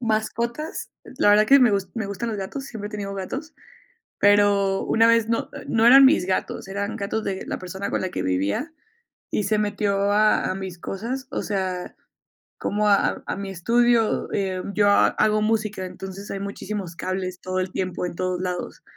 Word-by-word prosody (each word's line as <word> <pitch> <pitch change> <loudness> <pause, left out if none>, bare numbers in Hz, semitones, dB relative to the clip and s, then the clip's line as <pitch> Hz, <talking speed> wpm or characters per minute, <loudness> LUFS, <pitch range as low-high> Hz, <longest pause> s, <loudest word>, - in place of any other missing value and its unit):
mascotas, 235 +6 -2 0.3
la 205 - +5
verdad 210 +1 +5
que 275 +4 +7
me 245 -3 +6
gus 200 -2 0
me 220 -4 -3
gustan 200 +4 -4
los 220 - -3
gatos, 200 +8 -5
siempre 210 -5 -6
he - - -13
tenido 200 -2 -5
gatos, 265 - -6 0.7
pero 200 -1 +4
una 225 0 +3
vez 230 -1 +3
no 230 - -1 0.2
no 225 0 +2
eran 270 +3 +9
mis 265 - +4
gatos, 190 +1 -2
eran 200 +2 -3
gatos 210 +2 -2
de 190 -2 -3
la - - -4
persona 190 +2 -5
con - - -1
la 185 - -2
que - - -4
vivía 100 - -1 0.6
y 210 - 0
se 215 +2 +1
metió 205 -1 0
a 215 +1 +3
a - - -1
mis 190 -2 -6
cosas, 240 +9 -5
o - - -2
sea, 185 -3 -3 0.6
como 210 +1 0
a 200 -1 +2
a - - -3
mi 195 0 -5
estudio, 230 +4 +2
em, 190 -1 -2
yo 205 -1 +4
ha 200 - +5
hago 215 0 +2
música, 215 -3 0
entonces 190 +2 -8
hay 195 - -4
muchísimos 200 -3 -5
cables 185 0 -4
todo 185 0 -2
el 185 0 -2
tiempo 185 -1 -2
en 170 - -7
todos 185 0 -2
lados. 180 -1 -4
200 Hz, 190 wpm, -23 LUFS, 190-220 Hz, 0.7 s, eran